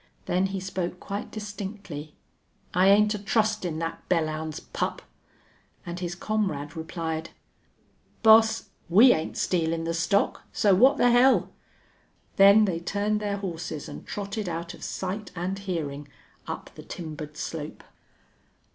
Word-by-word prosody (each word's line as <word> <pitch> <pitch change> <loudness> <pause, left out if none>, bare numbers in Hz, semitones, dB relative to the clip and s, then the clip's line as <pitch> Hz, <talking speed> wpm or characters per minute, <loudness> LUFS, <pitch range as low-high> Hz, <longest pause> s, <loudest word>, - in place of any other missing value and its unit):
Then 185 +2 +1
he 195 0 -4
spoke 185 -1 -4
quite 200 +1 -5
distinctly, 200 -7 -7 0.6
"I 185 +2 +4
ain't 210 +2 +5
a 210 - -4
trustin' 210 -5 0
thet 165 0 -3
Belllounds 155 -2 -1
pup!" - - -2 0.8
and 175 +1 -5
his 175 -1 -3
comrade 175 -7 -2
replied, 160 0 -4 0.9
"Boss, 220 0 +6 0.2
we 225 +9 +8
ain't 160 - -3
stealin' 165 -2 0
the 165 0 -1
stock, 170 +5 +1
so 205 -2 +3
what 255 +9 +6
th' - - -1
hell!" 250 +2 +4 0.9
Then 200 +2 +8
they 175 -4 -1
turned 205 +4 -1
their 205 -1 -2
horses 165 -5 -5
and 145 - -8
trotted 205 -1 -4
out 170 0 -4
of - - -12
sight 195 +2 -4
and 185 +3 -3
hearing 150 -7 -4 0.4
up - - -6
the - - -10
timbered 155 -3 -7
slope. 155 -2 -5
185 Hz, 135 wpm, -26 LUFS, 165-205 Hz, 0.9 s, we